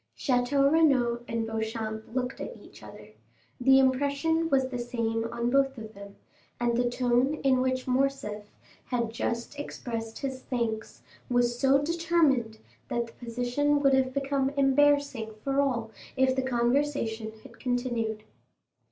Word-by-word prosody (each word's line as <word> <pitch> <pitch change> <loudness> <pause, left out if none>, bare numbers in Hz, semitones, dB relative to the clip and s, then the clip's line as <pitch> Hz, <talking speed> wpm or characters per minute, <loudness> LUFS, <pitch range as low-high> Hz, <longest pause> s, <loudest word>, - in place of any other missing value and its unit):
Château 275 +2 +2
Renaud 255 -7 +3
and 230 0 -2
Beauchamp 220 0 -4
looked 250 0 -2
at - - -6
each - - -16
other; - - -12 0.5
the 265 +2 +6
impression 280 +5 +2
was 265 -2 +2
the 250 -2 -4
same 230 -2 -2
on 235 0 -1
both 270 0 +2
of 220 -1 -8
them, 200 0 -11 0.4
and 240 -1 +1
the 245 0 +1
tone 250 +3 +1
in 260 -2 +3
which 255 0 0
Morcerf 255 -5 -1 0.4
had 235 -3 -2
just 235 +5 -3
expressed 230 -5 -5
his 265 -1 -4
thanks 230 -4 -3 0.3
was 240 -1 +1
so 270 0 +5
determined 305 -8 +1 0.3
that 235 0 -1
the 230 - -15
position 245 +5 0
would 275 -1 +3
have 260 -1 +3
become 275 0 0
embarrassing 275 -5 +2
for 275 0 +2
all 235 -5 -1 0.3
if 260 0 +3
the 265 - +1
conversation 240 -3 0
had - - -15
continued. 240 -4 -2
250 Hz, 145 wpm, -28 LUFS, 230-275 Hz, 0.5 s, the